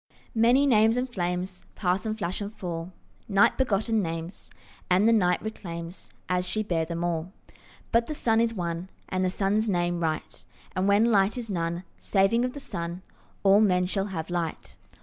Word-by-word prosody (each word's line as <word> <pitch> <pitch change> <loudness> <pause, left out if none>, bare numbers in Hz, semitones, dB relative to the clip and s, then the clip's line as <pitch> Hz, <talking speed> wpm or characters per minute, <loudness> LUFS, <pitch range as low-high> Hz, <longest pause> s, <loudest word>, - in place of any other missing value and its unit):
Many 240 +5 +4
names 225 -3 +4
and 250 +1 0
flames 180 -4 -3
Pass 185 +1 0
and 215 0 -2
flash 185 -1 -3
and 205 0 -4
fall, 175 -4 -5 0.4
Night 200 0 +4
begotten 225 -3 +1
names, 165 +1 -5 0.4
And 185 +4 +4
the 230 - +6
night 180 -5 +3
reclaims, 170 -5 -6 0.2
As 180 0 0
she 215 +3 0
bare 165 -5 0
them, 170 +1 -4
all. 170 0 -2 0.6
But 230 0 +3
the 305 - -3
sun 225 -4 +2
is 230 -1 +2
one, 170 0 -3 0.2
And 185 0 0
the 185 - +2
sun's 205 +3 +1
name 175 -2 0
Right; 160 -2 -3 0.3
And 185 +1 +1
when 210 +4 +4
light 200 +2 +3
is 230 -3 -4
none 170 -1 -2 0.2
Saving 200 +4 +2
of 250 0 -1
the 285 - -7
sun, 170 -7 -5 0.4
All 200 +1 +6
men 180 -4 +3
shall 195 +2 -1
have 170 -3 -5
light. 170 -2 -3
190 Hz, 180 wpm, -27 LUFS, 175-220 Hz, 0.6 s, the